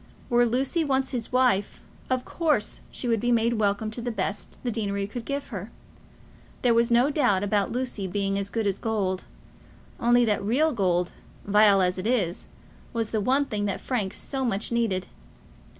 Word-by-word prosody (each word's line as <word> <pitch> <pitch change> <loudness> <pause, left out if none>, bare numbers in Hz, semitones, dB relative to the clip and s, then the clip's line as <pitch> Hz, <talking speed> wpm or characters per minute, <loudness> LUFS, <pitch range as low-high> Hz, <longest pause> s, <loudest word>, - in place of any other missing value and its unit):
Were 240 0 +5
Lucy 265 +8 +1
once 270 -2 0
his 240 -3 -4
wife, 250 -6 +2 0.3
of 255 -1 0
course 305 -11 0
she 250 - -5
would 230 -2 +2
be 240 +3 0
made 230 -1 +2
welcome 210 +1 0
to 235 - -5
the 240 - -2
best 200 -2 -4
the 245 - -1
deanery 200 -3 -2
could 225 +3 -7
give 280 0 -3
her. 205 -3 -6 0.9
There 245 -2 +5
was 230 +1 +3
no 240 +4 +4
doubt 245 -10 +2
about 205 -1 +1
Lucy 245 -5 -3
being 195 +1 -1
as 200 0 -3
good 225 +1 -2
as 200 -1 0
gold; 195 -5 -1 0.7
only 240 +1 +4
that 210 -2 +1
real 285 +9 +2
gold, 180 -5 +1 0.3
vile 205 -1 +5
as 180 +1 0
it 190 - -2
is, 200 -8 0 0.5
was 225 -2 -1
the 220 - 0
one 270 +6 +2
thing 210 -6 -2
that 200 -2 -2
Frank 210 -7 -2
so 270 -2 -3
much 220 -3 -2
needed. 225 -6 0
225 Hz, 180 wpm, -26 LUFS, 200-245 Hz, 0.9 s, Were